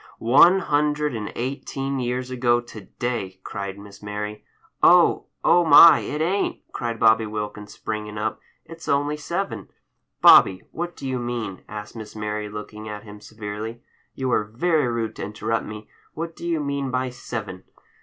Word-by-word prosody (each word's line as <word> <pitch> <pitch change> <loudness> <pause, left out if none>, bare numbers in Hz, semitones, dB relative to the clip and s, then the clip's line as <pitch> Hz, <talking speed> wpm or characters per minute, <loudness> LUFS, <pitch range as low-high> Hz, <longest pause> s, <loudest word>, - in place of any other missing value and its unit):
"One 155 +11 +6
hundred 150 -2 +1
and 110 -2 -4
eighteen 135 +2 -3
years 125 +1 -2
ago 120 -1 +2
to 120 -3 -10 0.2
day," 105 -6 -3
cried 100 -1 -5
Miss 100 0 -13
Mary— 105 0 -5 0.4
"Oh! - - +5 0.2
oh 175 - +5
my, 170 0 +9
it 150 +1 -4
ain't!" 195 +4 0
cried 115 -1 -3
Bobby 110 -1 +4
Wilkins, 105 -1 -6
springing 105 -1 -5
up. 110 +1 -2 0.3
"It's 165 0 -11
only 145 +1 +1
seven." 175 +6 -4 0.5
"Bobby, 95 -1 +7
what 175 +1 -5
do 135 - -6
you 130 -1 -2
mean?" 120 -6 -4
asked 105 +1 -8
Miss 110 -2 -9
Mary, 105 0 -3
looking 105 +1 -8
at 105 0 -7
him 105 -1 -12
severely. 110 +2 -7 0.3
"You 130 -1 -2
are 110 - +2
very 150 +7 +1
rude 115 -2 -2
to - - -5
interrupt 105 +2 -2
me. 105 0 -8 0.3
What 165 +1 -5
do 170 - -7
you 165 -2 0
mean 140 -1 -2
by 130 0 -1
'seven? 110 -6 -7
115 Hz, 165 wpm, -23 LUFS, 105-140 Hz, 0.5 s, my